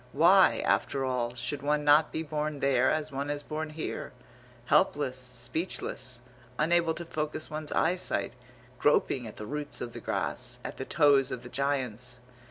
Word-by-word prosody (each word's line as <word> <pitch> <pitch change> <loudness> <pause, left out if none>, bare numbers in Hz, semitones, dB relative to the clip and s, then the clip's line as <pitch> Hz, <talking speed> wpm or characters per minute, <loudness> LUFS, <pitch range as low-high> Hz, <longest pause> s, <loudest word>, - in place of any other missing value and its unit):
Why, 180 +6 +5
after 135 -1 +1
all, 125 -2 -1
should 125 +3 -4
one 150 +1 +1
not 150 +1 +5
be 160 - -2
born 150 -1 -3
there 130 -2 +3
as 155 -1 -1
one 140 +1 -3
is 145 0 -2
born 155 +1 -4
here, 155 -2 -5 0.5
helpless, 140 -1 +2
speechless, 125 0 -4 0.4
unable 165 +1 +3
to 170 - -6
focus 155 -1 -4
one's 155 -1 -4
eyesight, 180 +2 0 0.5
groping 135 -4 +2
at 105 - -9
the 105 - -6
roots 145 +3 -5
of 120 -1 -5
the - - -6
grass, - - -2
at - - -6
the - - -4
toes 140 -2 +4
of 125 - -5
the 120 - -9
Giants? 125 -2 -2
145 Hz, 165 wpm, -29 LUFS, 125-155 Hz, 0.5 s, Why